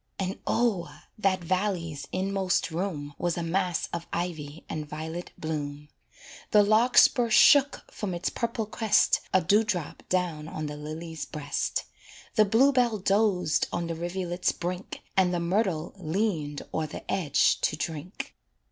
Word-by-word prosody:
And 190 0 -3
O! 210 -8 +1 0.3
that 190 -3 +1
valley's 175 -5 -1
inmost 190 -1 0
room 160 -5 -3
Was 175 -1 0
a 170 - -1
mass 180 +1 0
of 170 0 -4
ivy 160 -3 -4
and 150 -2 -5
violet 160 +3 -6
bloom; 150 -2 -4 0.6
The 210 -1 +6
larkspur 235 +2 +5
shook 285 +5 +6
from 190 -4 -4
its 175 - -2
purple 230 -1 -2
crest 220 0 +3
A 185 - +4
dew 205 +6 +4
drop 180 -8 -3
down 170 -4 -1
on 155 -1 -5
the 150 0 -5
lily's 155 +2 -6
breast; 150 -2 -2 0.5
The 215 - +5
blue 230 +7 +5
bell 245 -4 +2
dozed 195 -4 +2
on 170 - -2
the 165 - -3
rivulet's 175 +1 -1
brink, 180 +2 -5
And 185 -2 +4
the 175 - 0
myrtle 175 -2 0
leaned 165 -5 -2
o'er 160 -1 -1
the - - -8
edge 160 -7 +2
to - - +1
drink. 160 +3 -5
180 Hz, 150 wpm, -27 LUFS, 160-200 Hz, 0.6 s, The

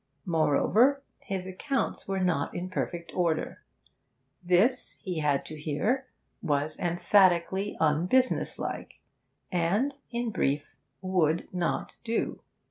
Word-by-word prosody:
Moreover, 205 - +3 0.2
his 190 -2 -4
accounts 225 +7 -2
were 195 0 -1
not 180 -6 0
in 180 +1 -4
perfect 170 -2 -3
order. 170 -3 0 0.8
This, 190 +9 +2
he 180 -5 -2
had 145 -2 +1
to 155 -1 -8
hear, 220 - 0 0.3
was 150 -3 0
emphatically 185 +2 +3
unbusinesslike, 175 +12 +1 0.5
and, 195 +11 +1 0.2
in 235 -1 -2
brief, 145 -6 -1 0.3
would 170 -4 +1
not 175 -2 -2
do. 230 0 -2
180 Hz, 105 wpm, -28 LUFS, 160-210 Hz, 0.8 s, Moreover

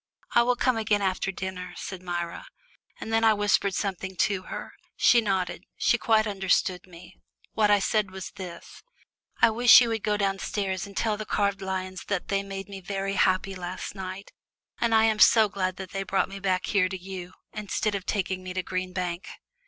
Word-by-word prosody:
"I 235 - +6
will 245 +1 +2
come 255 -1 +1
again 210 -2 +1
after 190 0 0
dinner," 185 -1 -6
said 190 -2 -6
Myra, 175 - -4 0.5
and 225 - -5
then 225 0 +3
I 220 -1 +5
whispered 205 -2 +2
something 190 -1 -3
to 195 +1 +1
her. - - -6 0.2
She 240 - +5
nodded; 190 -4 -1
she 240 - +2
quite 220 -1 +3
understood 190 -3 0
me. 175 0 -14 0.4
What 215 -1 +3
I 205 - +6
said 205 0 +1
was 190 0 -7
this: 185 -3 -10 0.6
"I 230 - +7
wish 240 +2 +8
you 240 -2 +2
would 225 -1 -1
go 210 0 0
downstairs 195 -1 -2
and 200 - -11
tell 215 -2 +1
the 215 - -5
carved 200 -1 0
lions 185 -1 -4
that 200 -3 -3
they 195 0 +1
made 195 0 -7
me 195 -1 -8
very 195 +1 -3
happy 190 0 +2
last 180 0 -6
night, 190 0 -7 0.5
and 230 -1 +2
I 220 - +5
am 220 -1 +2
so 220 -1 +7
glad 185 -2 -2
they 190 0 -5
brought 195 0 0
me 195 0 -7
back 185 -2 0
here 185 -3 +2
to 190 - -4
you, 185 -1 -8 0.2
instead 215 0 -2
of 200 -1 -4
taking 190 -2 -1
me 185 0 -7
to 185 - -1
Green 185 0 -3
Bank." 180 -1 -3
195 Hz, 195 wpm, -27 LUFS, 185-210 Hz, 0.6 s, wish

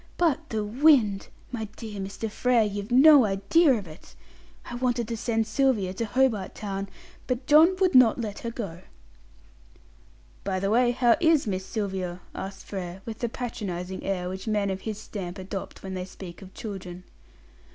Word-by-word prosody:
But 335 -5 +1
the 215 -2 -1
wind! 225 -3 +3 0.2
My 230 -3 -3
dear 215 -3 -7
Mr. 195 +3 -4
Frere, 235 +2 +2
you've 205 0 -4
no 275 +2 +8
idea 215 - +3
of 210 -4 -4
it; 155 +3 -14 0.5
I - - -8
wanted 240 -2 0
to 230 - -2
send 225 0 0
Sylvia 215 -5 +1
to 230 +4 -2
Hobart 225 -4 +1
Town, 195 -1 -4 0.4
but 250 0 -2
John 315 +5 +6
would 375 -2 +3
not 255 -2 +6
let 210 -3 -4
her 235 - -4
go." 200 -8 -6 1.6
"By 190 -1 -1
the 195 +2 0
way, 240 +2 +4
how 240 -1 +3
is 320 -4 +4
Miss 190 -2 -3
Sylvia?" 190 -5 -3
asked 195 0 -7
Frere, 185 -1 -6
with 225 -1 -6
the 235 - -1
patronising 190 -7 -5
air 180 -2 -2
which 190 +3 -6
men 205 -2 +1
of 190 0 -4
his 215 -2 -5
stamp 190 -4 -6
adopt 190 +1 -7
when 190 -1 -5
they 185 -1 -4
speak 185 -1 -10
of 190 -1 -11
children. 185 -4 -7
210 Hz, 170 wpm, -26 LUFS, 190-245 Hz, 1.6 s, no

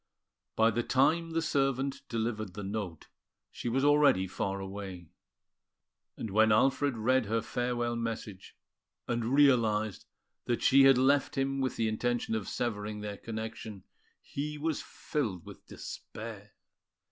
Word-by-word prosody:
By 115 +1 +4
the 120 +2 0
time 155 +7 +2
the 165 0 -1
servant 135 -2 0
delivered 110 -4 -2
the 105 - -5
note, 95 -5 -5 0.4
she 120 - -4
was 135 +4 +1
already 145 -10 +5
far 95 +1 -3
away; 95 -3 -7 1.1
and 110 - -5
when 110 +2 +4
Alfred 135 +4 +3
read 125 +1 +2
her 115 +2 +1
farewell 120 -1 -1
message, 115 -4 -5 0.5
and 120 -1 -1
realised 110 - +3 0.4
that 120 - -1
she 135 +1 +7
had 135 -1 +7
left 135 +2 +2
him 135 0 0
with 130 - -1
the 115 - 0
intention 120 +1 -1
of 110 -3 -2
severing 105 -3 -3
their 105 -1 -5
connection, 110 -2 -6 0.4
he 150 +2 -4
was 155 0 -1
filled 110 - -4
with - - -12
despair. 105 -2 -8
115 Hz, 135 wpm, -31 LUFS, 105-135 Hz, 1.1 s, she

